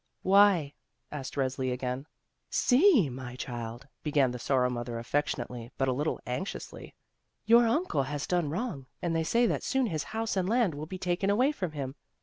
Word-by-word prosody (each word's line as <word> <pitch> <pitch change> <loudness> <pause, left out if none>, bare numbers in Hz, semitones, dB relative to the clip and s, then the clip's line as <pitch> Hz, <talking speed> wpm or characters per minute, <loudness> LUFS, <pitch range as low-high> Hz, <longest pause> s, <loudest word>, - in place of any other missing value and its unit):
"Why?" 190 -7 +5 0.4
asked 135 -3 -6
Resli 130 -1 -1
again. 125 +2 -3 0.4
"See, 265 - +5
my 125 -1 -7
chUd," 120 0 -6
began 145 -4 +2
the 125 - -6
Sorrow 125 0 +1
mother 120 -1 -4
af 115 - -6
fectionately, 125 -5 -2
but 135 - +1
a 130 - +2
little 150 +5 -1
anxiously, 125 +10 -5 0.5
"your 235 +1 +6
uncle 240 - +1
has 145 +2 -3
done 175 -4 0
wrong, 165 - -4 0.2
and 170 -1 0
they 165 - +1
say 235 +9 +3
that - - 0
soon 265 -1 +1
his 160 -9 -2
house 225 -1 -2
and 190 -1 0
land 230 -6 +2
will 150 +2 -6
be 185 - -6
taken 180 +2 0
away 250 +8 +3
from 185 - -4
him. 135 -3 -4
150 Hz, 180 wpm, -29 LUFS, 130-200 Hz, 0.5 s, your